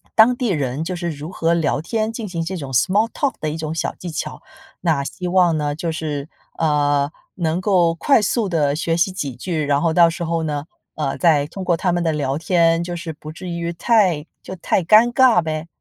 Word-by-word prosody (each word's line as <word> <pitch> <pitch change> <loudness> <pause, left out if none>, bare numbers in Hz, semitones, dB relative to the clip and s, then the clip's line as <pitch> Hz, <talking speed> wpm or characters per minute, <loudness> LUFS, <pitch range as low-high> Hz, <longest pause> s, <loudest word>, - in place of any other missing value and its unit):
当 230 +3 +6
地 245 0 -2
人 145 -4 -1
就 180 +3 -3
是 175 -1 -3
如 150 +3 -7
何 165 -2 +1
聊 160 -4 +1
天， 220 +7 -2
进 225 -1 -5
行 170 -3 -3
这 185 +3 -4
种 140 -5 -6
small 195 - +3
talk 280 -2 -1
的 155 - -2
一 - - -4
种 160 -1 -4
小 - - -2
技 180 - -8
巧。 155 - -5 0.4
那 160 -5 +1
希 180 +5 -5
望 175 -2 +3
呢， 145 -1 -1
就 165 +1 -3
是， 150 -3 -4 0.3
呃， 145 -2 +1 0.2
能 170 0 -1
够 180 -4 +3
快 250 - +3
速 215 0 0
地 150 -5 +1
学 165 +1 -1
习 180 +3 +2
几 145 -9 -4
句， 165 -1 -3
然 145 -1 +1
后 160 +1 +1
到 170 0 +6
时 170 +1 -5
候 165 0 -1
呢， 150 -2 -3 0.3
呃， 145 -3 -2
再 155 -5 +4
通 185 +6 -7
过 175 -2 +1
他 180 +2 0
们 175 0 0
的 165 - +1
聊 140 -3 -1
天， 165 +1 +2
就 175 0 -5
是 165 -1 -6
不 155 0 -10
至 180 +4 -9
于 170 -1 -3
太 180 -6 +2 0.2
就 185 - -8
太 185 - 0
尴 220 +7 +5
尬 255 -5 +5
呗。 155 0 -4
165 Hz, 265 characters per minute, -20 LUFS, 155-185 Hz, 0.4 s, 当